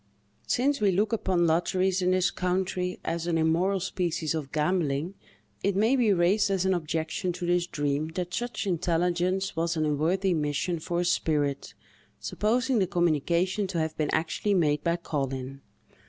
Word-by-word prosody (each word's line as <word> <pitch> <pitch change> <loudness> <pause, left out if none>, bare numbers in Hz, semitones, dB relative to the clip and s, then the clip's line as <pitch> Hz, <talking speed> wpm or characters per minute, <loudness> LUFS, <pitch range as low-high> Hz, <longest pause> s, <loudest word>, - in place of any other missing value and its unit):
Since 275 +1 +1
we 205 - +4
look 205 +4 +1
upon 185 -5 +1
lotteries, 185 +3 +1
in 180 - +2
this 185 +1 +2
country, 180 0 -1
as 165 +1 -2
an 170 -1 +1
immoral 170 +5 +2
species 175 -4 -2
of 150 -4 -4
gambling, 155 0 0 0.5
it 200 -1 +1
may 220 +6 +3
be 240 -5 +3
raised 190 +3 +3
as 190 -1 0
an 190 - +3
objection 160 +1 -2
to 180 0 -5
this 175 0 +1
dream, 145 -1 -1
that 180 -1 -3
such 240 -2 -3
intelligence 180 +1 0
was 165 0 -1
an 155 - +1
unworthy 170 +6 +1
mission 150 +2 -1
for 170 +2 -2
a - - -1
spirit, 150 -5 0 0.4
supposing 245 +3 0
the 190 - +2
communication 175 +4 +1
to 180 - -4
have 160 -1 -1
been 155 -2 -1
actually 165 +6 0
made 150 -4 +2
by 170 0 +1
Collin. 135 -5 -4
175 Hz, 165 wpm, -27 LUFS, 160-190 Hz, 0.5 s, we